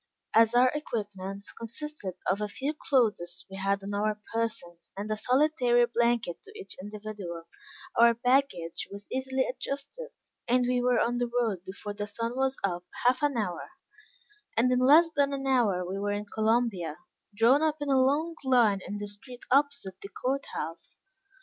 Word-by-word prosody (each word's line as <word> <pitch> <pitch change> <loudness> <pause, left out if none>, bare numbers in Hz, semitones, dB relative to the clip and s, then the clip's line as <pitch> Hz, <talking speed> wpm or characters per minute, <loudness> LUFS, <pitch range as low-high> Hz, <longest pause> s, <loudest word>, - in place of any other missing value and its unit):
As 225 +1 +5
our 250 +1 +6
equipments 200 -8 -5
consisted 230 - -7
of 195 +3 +1
a 210 - 0
few 280 +8 -3
clothes 220 - 0
we 195 - -6
had 195 0 0
on 200 +1 -5
our 210 +1 0
persons 215 -7 -3
and 210 +2 -4
a - - +1
solitary 250 0 +3
blanket 235 -6 0
to 420 +1 -13
each 405 - -8
individual, 205 -5 -7 0.5
our 235 0 +6
baggage 245 -9 +1
was 200 +1 -8
easily 265 0 0
adjusted, 280 - -5 0.4
and 250 +1 +3
we 250 0 +2
were 245 -1 +3
on 240 +1 +1
the 245 0 0
road 235 -7 -1
before 200 +2 -6
the 205 0 -4
sun 230 +3 -3
was 265 0 +1
up 175 -2 -1 0.2
half 255 +1 +4
an 290 -4 +1
hour; 180 -6 -3 0.8
and 250 +3 +4
in 250 - +3
less 295 +7 +7
than 280 -1 +2
an 270 -1 -3
hour 225 -9 +2
we 195 +2 -3
were 205 0 -1
in 205 +1 -3
Columbia, 220 -6 0 0.4
drawn 235 +7 +5
up 310 -1 +1
in 290 -1 -3
a 265 -1 +4
long 300 +5 +1
line 240 -7 +4
in 205 - -4
the 205 - -4
street 240 +5 -11
opposite 280 -8 +1
the 200 - -8
court 270 +6 -2
house. 165 +2 -6
235 Hz, 175 wpm, -29 LUFS, 205-265 Hz, 0.8 s, less